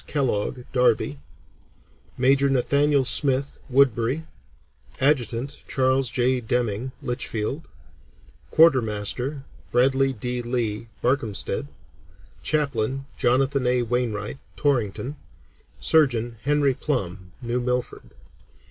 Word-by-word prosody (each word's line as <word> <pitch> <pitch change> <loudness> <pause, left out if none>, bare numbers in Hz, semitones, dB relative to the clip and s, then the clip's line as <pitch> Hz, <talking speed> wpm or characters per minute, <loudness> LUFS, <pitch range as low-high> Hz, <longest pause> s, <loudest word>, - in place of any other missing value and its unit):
Kellogg, 130 -3 -1
Derby; 120 - +2 1.0
major, 135 +2 +3
Nathaniel 140 +1 +2
Smith, 135 +2 +1
Woodbury; 130 +2 +2 0.7
adjutant, 135 -1 0
Charles 130 -1 +1
J. 125 +1 +1
Deming, 120 +1 -1
Litchfield; 125 +2 -3 0.8
quartermaster, 130 -2 +2 0.3
Bradley 135 +2 +3
D. 125 +1 -3
Lee, 115 -2 -2 0.2
Barkhamsted; 120 -5 0 0.7
chaplain, 135 -3 -1
Jonathan 130 +1 +2
A. 125 0 +2
Wainwright, 115 0 -2 0.2
Torrington; 135 0 -1 0.6
surgeon, 120 -7 +2
Henry 145 -2 +3
Plumb, 95 - -3
New 120 +1 -1
Milford. 125 0 -3
125 Hz, 85 wpm, -24 LUFS, 120-135 Hz, 1.0 s, major